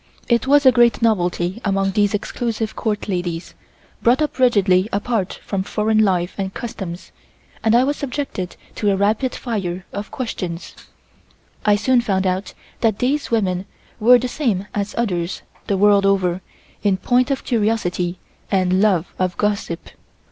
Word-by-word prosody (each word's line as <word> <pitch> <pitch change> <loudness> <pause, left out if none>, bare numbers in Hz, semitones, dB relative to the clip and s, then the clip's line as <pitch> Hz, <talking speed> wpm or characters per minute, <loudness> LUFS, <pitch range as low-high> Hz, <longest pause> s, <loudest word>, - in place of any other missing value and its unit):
I 235 - +5
was 285 +1 +5
a 260 - +9
great 240 -1 +3
novelty 180 -2 +1
among 195 -1 +1
these 205 +1 +2
exclusive 220 +1 -3
Court 210 -3 -2
ladies, 175 -3 -3 0.5
brought 250 +6 +4
up 300 - -4
rigidly 200 -6 +3
apart 205 -1 -1
from 195 -2 -1
foreign 215 +2 0
life 180 -3 +1
and 190 -1 -2
customs, 190 -7 -6 0.5
and 225 0 +4
I 245 - +5
was 285 +2 0
subjected 265 -9 -4 0.2
to 210 - +1
a 195 - +3
rapid 215 +6 +1
fire 190 -6 -3
of 205 +1 -5
questions. 185 -9 -5 0.9
I 210 - +6
soon 240 +4 +3
found 195 -5 0
that 185 +2 -1 0.4
these 280 +4 0
women 195 -4 0 0.3
were 245 +3 +7
the 250 +1 -2
same 230 -8 -1
as 205 0 -3
others 185 -6 -1 0.2
the 200 - +1
world 200 0 +5
over 185 -2 +1 0.4
in 200 -2 +2
point 250 +6 +2
of 275 -1 -1
curiosity 205 -6 0 0.3
and 185 -1 +2
love 190 -5 +2
of 185 -1 -1
gossip. 205 -5 -2
205 Hz, 150 wpm, -20 LUFS, 185-235 Hz, 0.9 s, a